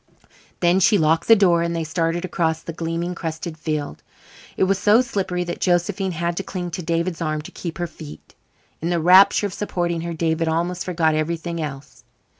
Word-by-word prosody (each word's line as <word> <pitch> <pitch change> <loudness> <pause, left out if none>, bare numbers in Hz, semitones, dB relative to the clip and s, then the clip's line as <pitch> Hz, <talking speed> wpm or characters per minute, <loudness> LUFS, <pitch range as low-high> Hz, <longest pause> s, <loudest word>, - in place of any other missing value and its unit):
Then 175 +1 +4
she 205 +2 +4
locked 160 0 +2
the 225 - +8
door 180 -5 +4
and 170 0 -1
they 165 - -1
started 165 +2 -1
across 160 -3 -1
the 165 - -6
gleaming, 165 +2 -3
crusted 165 -1 -5
field. 155 -2 -4 0.6
It - - +2
was 195 0 +2
so 215 +4 +5
slippery 190 -7 -2
that 175 0 -6
Josephine 185 +1 0
had 170 +1 -2
to 195 - -2
cling 180 -2 -5
to 180 - -4
David's 170 +1 -2
arm 155 -2 -2
to - - -10
keep 170 -3 -6
her 175 - -2
feet. 160 -3 -11 0.5
In 165 - -1
the 175 -1 +1
rapture 185 +5 +6
of 200 - -3
supporting 175 -5 -2
her 170 0 -4
David 160 0 0
almost 175 +2 -1
forgot 165 -3 +1
everything 165 +2 -2
else. 140 -2 -7
170 Hz, 195 wpm, -22 LUFS, 160-180 Hz, 0.6 s, the